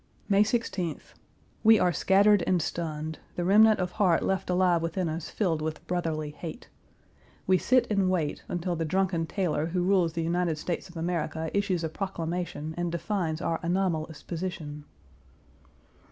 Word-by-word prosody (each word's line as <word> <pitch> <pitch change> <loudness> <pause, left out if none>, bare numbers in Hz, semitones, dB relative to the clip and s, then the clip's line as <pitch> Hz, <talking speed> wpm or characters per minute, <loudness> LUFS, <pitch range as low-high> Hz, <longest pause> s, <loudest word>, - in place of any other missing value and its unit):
May 200 -1 +4
16th. 210 -7 -2 0.5
We 220 0 +7
are 180 -3 +2
scattered 200 +2 +4
and 185 -1 +3
stunned, 155 -1 -4 0.2
the 175 - -2
remnant 215 +3 +6
of 180 -1 -1
heart 180 -5 +2
left 190 -1 -1
alive 180 -2 +3
within 165 +2 -1
us 160 0 -4
filled 170 -7 0
with 155 0 -4
brotherly 160 -4 -2
hate. 165 +8 -8 0.8
We 185 -1 +4
sit 255 0 +3
and 195 -2 +2
wait 165 -6 -1
until 175 0 -2
the 165 - -2
drunken 175 0 0
tailor 160 -5 -1
who 175 +1 -1
rules 180 -3 +2
the 165 - -2
United 170 -1 0
States 175 +3 -4
of 175 - -11
America 160 -1 -2
issues 195 -4 0
a 160 - -1
proclamation, 170 -3 -4
and 175 -1 -1
defines 170 -2 -2
our 165 - 0
anomalous 170 -4 -1
position. 160 -4 -5
175 Hz, 155 wpm, -28 LUFS, 160-190 Hz, 0.8 s, We